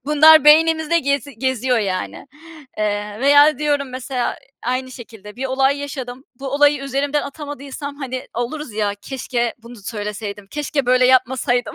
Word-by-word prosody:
Bunlar 300 +1 +7
beynimizde 320 +2 +5
gezi 280 -1 -2
geziyor, 260 -2 0
yani. 190 +4 -3 0.5
Eee, 210 0 -2
veya 290 +3 +5
diyorum 290 -3 0
mesela 255 0 -3 0.3
aynı 255 +2 -2
şekilde 225 -4 -12
bir 265 +1 -3
olay 270 +2 +1
yaşadım, 265 -2 -7 0.2
bu 275 - -4
olayı 290 +1 +3
üzerimden 275 +2 -1
atamadıysam, 285 -1 -7
hani, 260 -2 -5
oluruz 245 +3 -4
ya, 205 -1 -1
"Keşke 245 -3 -3
bunu 235 +1 -13
söyleseydim, 205 -1 -6
keşke 290 -1 -2
böyle 255 0 +4
yapmasaydım." 255 -1 +1
260 Hz, 140 wpm, -20 LUFS, 240-285 Hz, 0.5 s, Bunlar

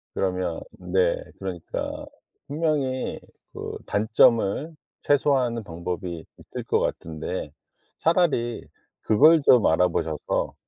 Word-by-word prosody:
그러면 90 -3 -1
네 90 -1 +1 0.2
그러니까 90 -3 -5 0.4
분명히 145 -4 -1 0.3
그 - - -6
단점을 110 +7 +2 0.3
최소화하는 130 -5 +2
방법이 85 0 -5
있을 - - -8
것 - - +1
같은데 80 -1 -4 0.5
차라리 160 -9 +1 0.3
그걸 155 +8 +6
좀 125 -5 +5
알아 90 +3 +4
보셔서 80 -3 -2
105 Hz, 225 characters per minute, -25 LUFS, 90-135 Hz, 0.5 s, 그걸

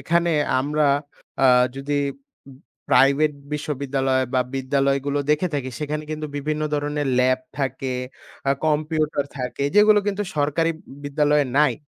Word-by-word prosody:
এখানে 170 +1 +1 0.3
আমরা 150 +2 +1 0.6
আ - - +8 0.3
যদি 145 +1 -1 0.9
প্রাইভেট 140 +4 +4 0.2
বিশ্ববিদ্যালয় 135 -3 -1
বা 130 - +4
বিদ্যালয়গুলো 140 +1 0
দেখে 150 +4 +2
থাকি 130 -2 -2
সেখানে 150 0 -3
কিন্তু 155 0 -4
বিভিন্ন 150 +2 -2
ধরনের 145 -1 -1
ল্যাব 130 0 +3 0.2
থাকে, 130 -1 -2 0.6
আ - - +5
কম্পিউটার 155 -1 0
থাকে 125 +2 -3
যেগুলো 210 0 +6
কিন্তু 205 0 -1
সরকারি 150 +3 +1 0.3
বিদ্যালয়ে 145 0 +2
নাই। 150 -5 +4
145 Hz, 120 wpm, -23 LUFS, 135-155 Hz, 0.9 s, আ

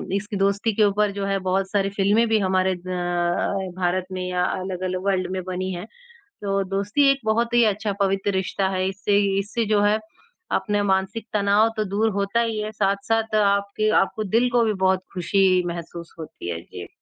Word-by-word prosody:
इसकी 205 +1 -3
दोस्ती 200 +2 0
के 215 - +4
ऊपर 205 0 +2
जो 200 0 -4
है 195 0 0
बहुत 190 +1 0
सारी 200 -1 +1
फ़िल्में 205 +4 +2
भी 220 -1 +3
हमारे 185 -1 +1
अ, - - -6 1.0
भारत 180 +1 0
में 185 -1 -4
या 180 0 0
अलग-अलग 185 0 -3
वर्ल्ड 185 -2 +1
में 190 0 -2
बनी 185 +1 -3
हैं। 175 +3 -6 0.6
तो 195 -1 0
दोस्ती 205 +9 +2
एक 275 - -1
बहुत 235 +2 +1
ही 240 -1 +5
अच्छा 210 0 -3
पवित्र 195 +1 +1
रिश्ता 190 0 -1
है। 185 0 -1
इससे 200 +1 +1 0.2
इससे 215 +3 -2
जो 210 -1 +2
है 210 +1 +3 0.6
अपना 205 +2 0
मानसिक 195 +3 0
तनाव 205 +2 +3
तो 215 - +1
दूर 210 +3 +1
होता 200 +3 0
ही 225 -2 -1
है, 215 0 -3
साथ-साथ 215 +2 0
आपके 200 +1 +2
आपको 215 +3 -2
दिल 230 +5 +2
को 240 -1 +3
भी 215 - +1
बहुत 185 0 +2
खुशी 185 0 +2
महसूस 170 0 -7
होती 150 - -7
है। 85 -1 -4
जी। 85 0 -10
200 Hz, 185 wpm, -23 LUFS, 185-215 Hz, 1.0 s, ही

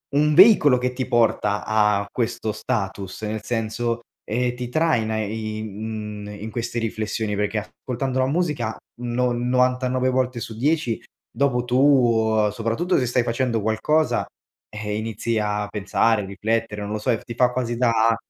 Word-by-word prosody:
un 150 +1 +3
veicolo 180 - +7
che 125 0 0
ti 130 0 -2
porta 110 -4 +2
a 105 -2 +2
questo 115 -2 -2
status, 100 -2 -3
nel 110 0 -3
senso, 115 +1 -2 0.2
eh, 120 +2 0
ti 125 0 -5
traina 125 -8 +1
in, 110 0 -5
mhmm, - - -8
in 110 0 -6
queste 120 0 -3
riflessioni, 110 -1 -2
perché 105 +1 -1
ascoltando 130 +4 -4
la 130 - +2
musica, 145 -8 -1 0.3
no 125 +1 0
99 125 +1 +1
volte 130 -1 0
su 110 - -6
10 145 -3 0 0.3
dopo 125 -3 +1
tu 120 -5 +3
soprattutto 115 - 0
se 125 - 0
stai 125 0 +2
facendo 115 -1 0
qualcosa, 130 +9 +1 0.4
ehm, 105 -1 -4
inizi 110 +1 -2
a 105 0 -1
pensare, 105 +1 +1
riflettere, 105 +2 -2
non 105 +1 -5
lo 110 - -2
so, 110 - +1
ti 120 - -8
fa 125 0 +3
quasi 120 -2 -2
da 115 -2 +3
115 Hz, 150 wpm, -23 LUFS, 110-125 Hz, 0.4 s, veicolo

